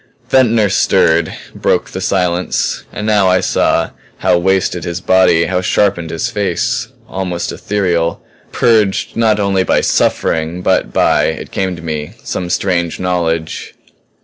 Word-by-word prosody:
Ventnor 115 -5 +4
stirred; 85 -3 +2 0.2
broke - - 0
the - - -5
silence. 90 -1 -1
And 105 - -5
now 105 -3 +3
I 95 0 +4
saw - - +1 0.3
how - - +2
wasted 95 -1 +1
was 85 - -8
his 85 +1 -3
body, 95 -3 +4
how 90 0 -1
sharpened 95 -3 +1
his 80 0 -3
face; 110 +5 -1 0.2
almost 90 -2 -3
ethereal; 85 -5 -1 0.3
purged 110 -4 +1
not 110 -2 +2
only 100 -2 +1
by - - +2
suffering 80 +3 0
but - - +1
by, - - +2
it - - -4
came 95 -2 -2
to 85 - -11
me, 75 +2 -4
some 90 -1 -4
strange 85 -3 -1
knowledge. 85 -3 -2
90 Hz, 145 wpm, -15 LUFS, 85-100 Hz, 0.3 s, Ventnor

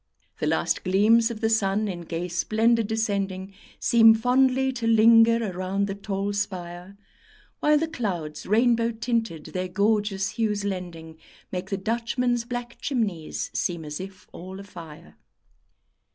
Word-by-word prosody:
The - - -1
last - - 0
gleams 215 +5 +4
of 230 -2 -7
the 220 - +2
sun 210 -1 +1
in 180 -3 -5
gay 170 +1 -4
splendour 225 +6 +2
descending 200 -3 -2 0.2
Seem 225 -1 +6
fondly 260 +3 +2
to 235 -2 -3
linger 225 -1 +5
around 185 +2 -1
the 200 - -3
tall 200 0 -3
spire, 185 -1 -5 0.6
While 300 0 +4
the 320 +2 0
clouds, 180 - -4
rainbow 230 +2 +3
tinted, 225 -8 -2
their 185 0 -2
gorgeous 200 0 0
hues 210 -3 -1
lending, 170 -4 -6 0.3
Make 185 +1 -4
the 195 - -1
Dutchmen's 235 +3 -1
black 245 0 -6
chimneys 205 - -2
seem 170 -3 -2
as 150 0 -5
if 190 0 -9
all 185 +2 -9
afire. 165 - -12
205 Hz, 135 wpm, -25 LUFS, 185-230 Hz, 0.6 s, Seem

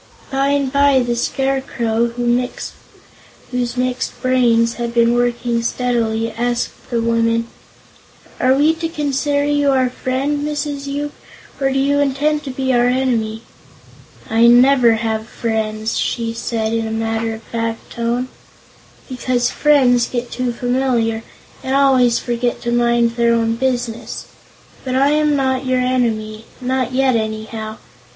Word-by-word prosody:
By 270 +1 +1
and 280 -1 0
by 280 -2 +4
the 240 -1 -1
Scarecrow, 240 -3 0
whose 245 0 -4
mixed 250 0 -2
brains 235 -3 +3
had 235 0 -4
been 235 0 +4
working 240 -1 0
steadily, 230 -2 -1
asked 240 0 -3
the 235 - 0
woman: 230 0 +1 0.9
"Are 260 +1 +4
we 300 +3 +4
to 330 0 -4
consider 285 -2 0
you 290 -1 +2
our 260 -2 +2
friend, 265 +4 -1
Mrs. 290 -1 -3
Yoop, 290 +1 -3 0.5
or 270 -1 +1
do 270 - 0
you 280 +1 +2
intend 290 +2 +1
to - - -4
be 260 0 -1
our 240 0 +3
enemy?" 235 -4 0 0.8
"I 225 +1 +4
never 245 0 +6
have 220 0 -2
friends," 220 -1 -2
she 230 -1 -1
said 225 -1 -2
in 225 -1 -1
a - - -4
matter 225 0 -2
of 220 - -12
fact 230 0 -4
tone, 235 +2 -1 0.8
"because 250 -1 -1
friends 255 -5 +3
get 245 -1 -4
too 250 -1 -1
familiar 245 -2 0 0.4
and 265 +1 -1
always 260 -4 +4
forget 240 0 -2
to 235 - -1
mind 235 -1 +2
their 235 0 +3
own 225 -1 +1
business. 245 -2 -3 0.6
But 255 -1 -2
I 275 +2 +3
am 300 -1 +2
not 260 -1 0
your 255 0 +2
enemy; 225 -4 -1
not 255 0 -1
yet, 260 -1 +2
anyhow. 220 0 -4
245 Hz, 140 wpm, -18 LUFS, 230-265 Hz, 0.9 s, never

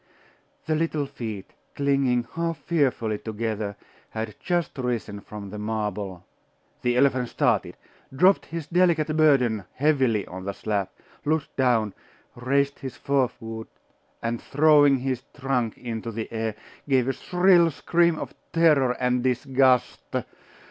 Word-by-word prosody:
The 160 - 0
little 155 -2 0
feet, 115 -8 -7 0.2
clinging 135 -4 +1
half 165 0 -2
fearfully 125 -10 0
together, 110 -2 -3 0.3
had 110 -1 -4
Just 175 -5 -1
risen 120 -5 -2
from 100 -2 -9
the 105 - -6
marble 105 -4 -3 0.6
The 125 0 +1
elephant 130 -2 +3
started, - - 0 0.3
dropped 180 +9 +4
his 165 -2 -5
delicate 165 -3 +2
burden 125 - +3
heavily 130 -7 +2
on 95 +1 -8
the 100 - -2
slab, 100 -3 -2 0.3
looked 155 0 -1
down, 115 -6 +2 0.4
raised 140 +3 0
his 130 -2 -7
forefoot, 120 -5 -2 0.5
and 115 0 -2
throwing 145 -1 +5
his 130 -1 -2 0.2
trunk 130 -5 -1
into 115 -1 -5
the 110 +1 -5
air, 110 -1 -2 0.3
gave 130 -2 +3
a 135 - +1
shrill 180 0 +4
scream 170 +2 +2
of - - -6 0.2
terror 150 -7 +4
and 125 0 +1
disgust.... 130 0 +2
130 Hz, 125 wpm, -25 LUFS, 110-145 Hz, 0.6 s, throwing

